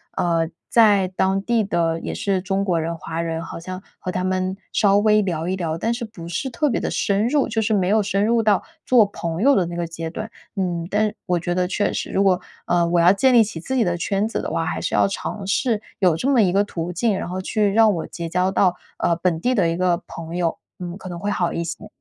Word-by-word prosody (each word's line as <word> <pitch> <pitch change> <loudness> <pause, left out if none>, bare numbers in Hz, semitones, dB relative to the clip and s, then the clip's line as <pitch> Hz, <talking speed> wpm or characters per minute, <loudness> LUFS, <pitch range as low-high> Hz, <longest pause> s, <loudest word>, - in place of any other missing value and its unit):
呃， 165 -2 +1 0.2
在 205 -5 +5
当 190 +1 +1
地 230 0 +1
的 165 -4 0
也 - - -4
是 195 -2 0
中 195 +1 -1
国 175 -4 +1
人、 165 +1 -3
华 165 +1 -4
人 165 -1 -3
好 165 - -7
像 185 +2 -7 0.2
和 185 - -4
他 180 0 -2
们 185 0 -1 0.2
稍 200 -2 +4
微 210 0 +4
聊 170 -4 -2
一 185 - 0
聊， 165 -3 -2
但 225 +7 0
是 235 +1 -4
不 195 -7 -9
是 185 +11 -3
特 255 +5 0
别 255 - 0
地 - - -1
深 200 +2 +1
入， 285 +2 +2
就 225 0 -1
是 215 0 +1
没 185 -3 +1
有 215 +1 +4
深 200 0 0
入 230 +1 +3
到 210 -3 +2 0.2
做 245 -4 +5
朋 170 -2 -4
友 280 +1 +5
的 180 -3 +2
那 170 - -6
个 170 - -1
阶 165 0 -5
段。 215 +6 -6 0.2
嗯， 175 -4 -2
但 210 +1 +1
我 180 -1 +1
觉 175 +1 -2
得 180 0 0
确 205 +2 0
实， - - -3
如 195 - +2
果， 185 -2 +3 0.2
呃， 175 -1 +2
我 170 0 +2
要 175 +2 +6
建 260 +6 +3
立 230 - +8
起 200 -6 -6
自 260 +11 -4
己 250 - +3
的 175 -3 0
圈 195 +4 0
子 225 - -3
的 - - -4
话， 165 +1 -1
还 160 - -3
是 - - -1
要 - - +4
尝 195 +1 -5
试 220 +3 +1 0.2
有 180 -4 +4
这 245 - -2
么 270 -4 +4
一 190 -4 +3
个 200 +2 +3
途 175 -4 -4
径， 200 +4 +1
然 - - -5
后 185 +1 -3
去 205 +2 0
让 220 0 +5
我 165 - -4
结 170 -1 -6
交 180 +3 +1
到， 185 -2 +3 0.2
呃， 170 - +1
本 170 -2 0
地 250 +9 +1
的 190 -8 +2
一 165 - -2
个 180 -1 +1
朋 165 0 -7
友， 170 -2 0 0.2
嗯， 175 0 -6
可 195 - -10
能 175 -2 -6
会 205 +4 -2
好 175 -4 0
一 170 - -2
些。 170 +5 -6
185 Hz, 280 characters per minute, -22 LUFS, 170-210 Hz, 0.2 s, 立